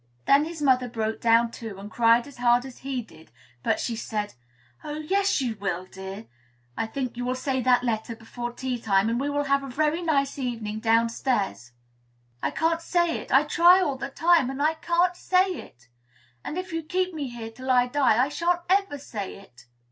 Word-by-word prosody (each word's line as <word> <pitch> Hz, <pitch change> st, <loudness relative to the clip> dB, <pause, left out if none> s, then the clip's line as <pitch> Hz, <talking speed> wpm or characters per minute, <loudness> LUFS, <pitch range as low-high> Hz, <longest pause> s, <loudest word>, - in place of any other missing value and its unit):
Then 280 Hz, +2 st, +5 dB
his 320 Hz, -2 st, -6 dB
mother 255 Hz, -3 st, +3 dB
broke 220 Hz, -1 st, -3 dB
down, 230 Hz, 0 st, +4 dB
too, 225 Hz, -4 st, -8 dB
and 205 Hz, +2 st, -9 dB
cried 235 Hz, 0 st, +4 dB
as 285 Hz, -, -13 dB
hard 245 Hz, +1 st, +3 dB
as 260 Hz, -2 st, -10 dB
he 265 Hz, -2 st, -3 dB
did; 160 Hz, -7 st, -18 dB, 0.3 s
but -, -, 0 dB
she 235 Hz, -, -2 dB
said, 210 Hz, -2 st, -4 dB, 0.5 s
"Oh! 295 Hz, -, -5 dB
yes, 380 Hz, +3 st, +1 dB
you 240 Hz, -4 st, -2 dB
will, 185 Hz, -2 st, -2 dB
dear. 190 Hz, +3 st, -8 dB, 0.5 s
I 225 Hz, -, -2 dB
think 255 Hz, +1 st, -4 dB
you 245 Hz, -, -3 dB
will 250 Hz, +1 st, -1 dB
say 260 Hz, 0 st, -1 dB
that 250 Hz, 0 st, +3 dB
letter 230 Hz, -1 st, -2 dB
before 240 Hz, +1 st, -6 dB
tea 250 Hz, -1 st, -4 dB
time, 200 Hz, 0 st, +2 dB
and 235 Hz, +1 st, 0 dB
we 285 Hz, -, -1 dB
will 290 Hz, 0 st, 0 dB
have 275 Hz, 0 st, +2 dB
a 300 Hz, +5 st, -1 dB
nice 285 Hz, -4 st, 0 dB
evening 225 Hz, -4 st, -3 dB
downstairs 230 Hz, -, +1 dB
together." 120 Hz, 0 st, -25 dB, 0.6 s
"I -, -, 0 dB
can't 330 Hz, +1 st, 0 dB
say 345 Hz, 0 st, +1 dB
it. -, -, -10 dB
I 270 Hz, +2 st, +6 dB
try 345 Hz, +4 st, +6 dB
all 295 Hz, -7 st, 0 dB
the 270 Hz, +1 st, -5 dB
time, 325 Hz, -1 st, +3 dB
and 270 Hz, +1 st, -5 dB
I 305 Hz, +2 st, +3 dB
can't 345 Hz, +2 st, +1 dB
say 370 Hz, +1 st, +2 dB
it; 120 Hz, -, -10 dB, 0.6 s
and, 310 Hz, -, -5 dB
if 370 Hz, -1 st, -5 dB
you 330 Hz, -, -1 dB
keep 365 Hz, +3 st, -1 dB
me 295 Hz, -4 st, -4 dB
here 230 Hz, -2 st, -7 dB
till 255 Hz, +3 st, -8 dB
I 250 Hz, -1 st, +5 dB
die, 250 Hz, -3 st, +2 dB
I -, -, -5 dB
shan't 345 Hz, +3 st, 0 dB
ever 390 Hz, -6 st, +2 dB
say 215 Hz, -8 st, -6 dB
it." 125 Hz, -11 st, -17 dB
255 Hz, 205 wpm, -26 LUFS, 225-305 Hz, 0.6 s, I